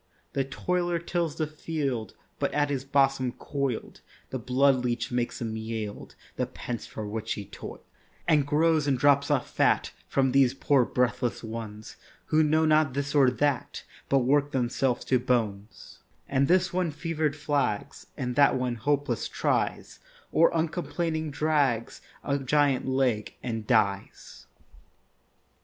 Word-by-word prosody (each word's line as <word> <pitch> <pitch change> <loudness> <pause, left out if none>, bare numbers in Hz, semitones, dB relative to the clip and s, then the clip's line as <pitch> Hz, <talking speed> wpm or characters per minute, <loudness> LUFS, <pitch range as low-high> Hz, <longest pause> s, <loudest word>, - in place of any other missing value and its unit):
The 135 - +1
toiler 175 +5 -1
tills 170 -2 -2
the 155 - -1
field, 145 - -3 0.2
But - - 0
at 145 -1 +2
his 135 -2 -2
bosom 135 -2 +2
coil'd 140 -5 -4 0.3
The 130 - -3
blood 130 +2 +3
leach 120 0 -1
makes 120 -1 -1
him 115 -2 -3
yield 110 -2 -5 0.2
The - - 0
pence 120 -2 -6
for 110 -1 -6
which 110 +1 -3
he 105 - -6
toil'd, - - -9 0.5
And 150 -4 +3
grows 155 0 +2
and 135 -2 +2
drops 140 +1 +4
off 145 -4 +1
fat - - +2 0.2
From 135 -1 +2
these 135 -1 +4
poor 135 -2 +3
breathless 125 -1 -1
ones, 110 -1 -7 0.4
Who 155 - +6
know 155 +1 +3
not 155 -3 +3
this 140 0 -2
or 140 -3 +5
that 140 0 -1 0.3
But 135 -2 +3
work 145 +2 +3
themselves 125 0 0
to 130 - +2
bones; 110 -5 -2 0.3
And 135 0 +2
this 185 0 +3
one 180 -2 +1
fever'd 155 -1 -2
flags, 145 -8 -2
And 125 -1 -3
that 140 0 +5
one 125 -1 -1
hopeless 145 +4 0
tries, - - -1 0.3
Or 165 +1 +5
uncomplaining 160 -1 -2
drags 145 -6 0 0.2
A 140 0 0
giant 140 -1 +2
leg, 130 -5 0
and 115 -3 -4
dies. 100 -4 -1
135 Hz, 145 wpm, -27 LUFS, 120-150 Hz, 0.5 s, Who